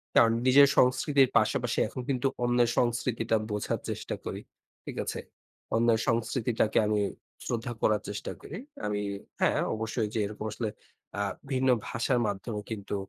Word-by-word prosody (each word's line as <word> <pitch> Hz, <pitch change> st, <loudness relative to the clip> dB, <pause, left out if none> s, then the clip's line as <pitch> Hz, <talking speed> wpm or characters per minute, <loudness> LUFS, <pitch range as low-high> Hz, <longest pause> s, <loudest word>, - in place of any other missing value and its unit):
কারণ 115 Hz, -1 st, +7 dB, 0.2 s
নিজের 140 Hz, +2 st, +8 dB
সংস্কৃতির 135 Hz, +1 st, +4 dB
পাশাপাশি -, -, +1 dB
এখন 130 Hz, -, -6 dB
কিন্তু 135 Hz, 0 st, +1 dB, 0.2 s
অন্যের 120 Hz, -1 st, +3 dB
সংস্কৃতিটা 120 Hz, -1 st, +1 dB
বোঝার 105 Hz, -1 st, -1 dB
চেষ্টা -, -, -3 dB
করি। -, -, -4 dB, 0.4 s
ঠিক -, -, -6 dB
আছে? -, -, -3 dB, 0.6 s
অন্যের 115 Hz, 0 st, +4 dB
সংস্কৃতিটাকে 115 Hz, -2 st, +1 dB
আমি 105 Hz, 0 st, +2 dB, 0.5 s
শ্রদ্ধা 120 Hz, 0 st, -2 dB
করার 105 Hz, -1 st, +3 dB
চেষ্টা 100 Hz, -1 st, -4 dB
করি। 165 Hz, -, -7 dB, 0.3 s
আমি 105 Hz, 0 st, -1 dB, 0.4 s
হ্যাঁ -, -, +3 dB, 0.2 s
অবশ্যই 110 Hz, 0 st, -1 dB
যে 110 Hz, -, 0 dB
এরকম 105 Hz, +1 st, -6 dB
আসলে 110 Hz, 0 st, -2 dB, 0.5 s
আ -, -, +1 dB, 0.3 s
ভিন্ন 130 Hz, 0 st, +2 dB, 0.2 s
ভাষার 120 Hz, +2 st, +1 dB
মাধ্যমে 105 Hz, +2 st, -3 dB
কিন্তু 105 Hz, -2 st, -4 dB
115 Hz, 140 wpm, -29 LUFS, 110-125 Hz, 0.6 s, নিজের